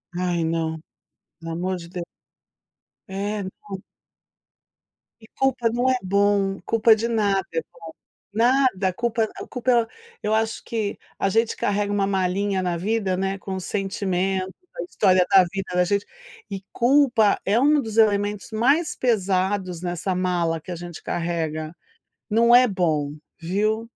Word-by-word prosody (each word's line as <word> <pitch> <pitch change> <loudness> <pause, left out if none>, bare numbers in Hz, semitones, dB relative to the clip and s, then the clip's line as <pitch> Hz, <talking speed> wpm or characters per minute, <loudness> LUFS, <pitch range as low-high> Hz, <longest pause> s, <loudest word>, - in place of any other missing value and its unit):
Ai, 175 -2 0
não, 160 -1 -1 0.6
pelo 165 0 -6
amor 185 +2 -2
de 170 -1 -9
Deu 175 0 -5 1.1
É, 200 +2 -3
não 190 0 -8 1.4
E 220 - -16
culpa 260 -3 +2
não 245 +3 +1
é 255 - +3
bom, 200 0 +2
culpa 225 0 +5
de 230 +2 -2
nada 200 -5 +1
é 165 - 0
bom. - - -20 0.5
Nada. 230 -5 +2
Culpa 230 0 0 0.2
culpa 240 -2 +1 0.3
eu 215 - 0
acho 220 0 0
que 220 -3 -3 0.2
a 195 - +1
gente 225 +3 +1
carrega 205 0 0
uma 200 -1 +1
malinha 195 0 0
na 175 -2 -1
vida, 195 0 0
né, 195 +1 -1
com 190 -1 -5
o - - -3
sentimento, 190 -1 -2 0.2
a 170 - -2
história 185 0 +3
da 190 -1 +8
vida 195 -1 -4
da 180 0 +3
gente, 200 +1 0 0.5
e 195 -1 -4
culpa 245 -4 +3
é 210 +5 +3
um 295 +2 +4
dos 220 -2 -6
elementos 205 0 +2
mais 275 +9 +2
pesados 190 -5 0
nessa 175 +1 -2
mala 175 -3 0
que - - -14
a - - -3
gente 175 0 -8
carrega. 160 -2 -3 0.6
Não 235 +2 +5
é 250 0 +7
bom, 155 -7 0 0.3
viu. 210 +6 0
195 Hz, 150 wpm, -23 LUFS, 180-225 Hz, 1.4 s, da